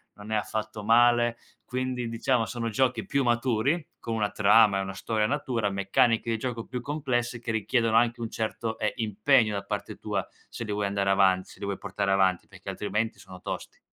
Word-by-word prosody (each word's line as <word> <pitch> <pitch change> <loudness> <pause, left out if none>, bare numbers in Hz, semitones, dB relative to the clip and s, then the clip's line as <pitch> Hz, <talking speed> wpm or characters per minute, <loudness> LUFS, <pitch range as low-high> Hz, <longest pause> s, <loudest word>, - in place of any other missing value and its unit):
non 105 +1 -10
è - - +2
affatto 110 0 -3
male, 120 +1 +4 0.3
quindi 125 -2 -3
diciamo 115 +1 +1
sono 120 -1 -3
giochi 120 +1 +1
più 140 -1 +1
maturi, 125 +5 +1
con 115 -1 -3
una 105 -2 0
trama 105 -1 +5
e - - 0
una 95 0 -4
storia 110 +2 -1
natura, 120 -4 -1
meccaniche 100 +4 +2
di 115 - +1
gioco 120 -1 -4
più 125 -1 -5
complesse, 125 -4 -2
che 115 - -3
richiedono 110 +1 +1
anche 120 +1 +3
un 115 -1 -3
certo, 110 0 -3
ehm, 105 - +1
impegno 110 +1 +2
da 100 - -3
parte 100 - -4
tua - - -3 0.2
se 115 - -6
lì 105 - -3
vuoi 105 -1 0
andare 100 0 0
avan 95 -1 +4
se - - -15
li 100 - -4
vuoi 100 -1 -2
portare 100 -1 -2
avanti, 95 -2 +2
perché 95 -1 -16
altrimenti 105 +3 -2
sono 90 -1 -12
tosti. - - -6
110 Hz, 200 wpm, -27 LUFS, 100-120 Hz, 0.3 s, trama